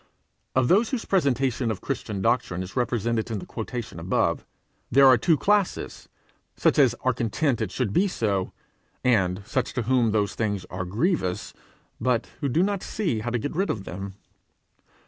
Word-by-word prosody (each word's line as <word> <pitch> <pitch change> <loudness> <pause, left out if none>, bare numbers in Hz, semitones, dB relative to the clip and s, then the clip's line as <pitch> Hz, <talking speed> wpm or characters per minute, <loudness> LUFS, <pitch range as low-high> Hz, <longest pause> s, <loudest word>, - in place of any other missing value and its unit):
Of 130 -1 +3
those 215 - +4
whose 255 -4 -3
presentation 135 - +1
of 110 -3 -2
Christian 105 -7 -4
doctrine 95 -7 +1
is 95 - -10
represented 120 -2 0
in 110 - -2
the 95 - -7
quotation 120 +1 -6
above, - - 0 0.4
there 140 +3 +6
are 130 -1 +8
two 155 +7 +3
classes 205 +1 0 0.5
such - - +2
as - - +5
are - - +2
content 120 +3 0
it - - -1
should 115 -6 -1
be 195 - +3
so, 100 - -1 0.5
and 95 -6 +2
such 130 +3 -1
to 125 - -1
whom 120 -1 +2
those 105 -1 +1
things 100 -4 -2
are 90 0 -3
grievous, 105 - -1 0.5
but 120 0 0
who 140 - -1
do 165 +8 +3
not 200 -1 0
see 170 - -2
how 115 +3 -3
to 120 - 0
get 145 +7 -4
rid 195 +4 0
of 105 - -2
them. 95 +2 -7
120 Hz, 175 wpm, -25 LUFS, 105-140 Hz, 0.5 s, are